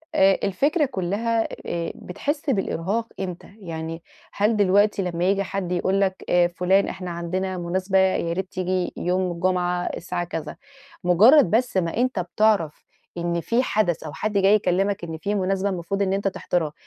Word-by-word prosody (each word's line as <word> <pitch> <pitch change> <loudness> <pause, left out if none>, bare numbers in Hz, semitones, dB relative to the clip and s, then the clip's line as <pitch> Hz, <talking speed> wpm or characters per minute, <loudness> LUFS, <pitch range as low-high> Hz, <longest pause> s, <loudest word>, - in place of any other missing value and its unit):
آآ 190 0 +5
الفكرة 285 - +2
كُلّها 225 +1 -1 0.2
آآ 170 -1 -3
بتحِس 285 - -4
بالإرهاق 205 0 -1
إمتى، 190 +1 -6
يعني 165 -2 -6 0.3
هل 210 +2 +1
دلوقتي 205 +1 +3
لمّا 175 -1 -2
ييجي 195 +1 +2
حد 185 -2 -4
يقول 190 +2 +1
لك 190 -1 0
آآ 175 -1 +4
فُلان 180 +3 +2
إحنا 180 -1 -5
عندنا 185 +2 -3
مناسبة 185 +2 -1
ياريت 190 0 0
تيجي 185 0 -1
يوم 180 0 0
الجمعة 180 0 0
الساعة 175 0 -3
كذا، 165 -2 -5 0.5
مُجرّد 205 - +6
بس 235 -3 +1
ما 170 +2 0
أنت 250 -5 +1
بتعرف 180 -2 +1 0.3
إن 170 0 -1
في 235 +7 +1
حدث 185 -9 0
أو 150 -2 -7
حد 215 -1 -3
جاي 195 +1 +5
يكلّمك 195 0 0
إن 160 -1 -5
في 200 +6 -2
مناسبة 195 +1 0
المفروض 190 +2 -3
إن 190 -1 +1
أنت 195 0 0
تحضرها، 170 -5 -1
185 Hz, 160 wpm, -23 LUFS, 175-200 Hz, 0.5 s, مُجرّد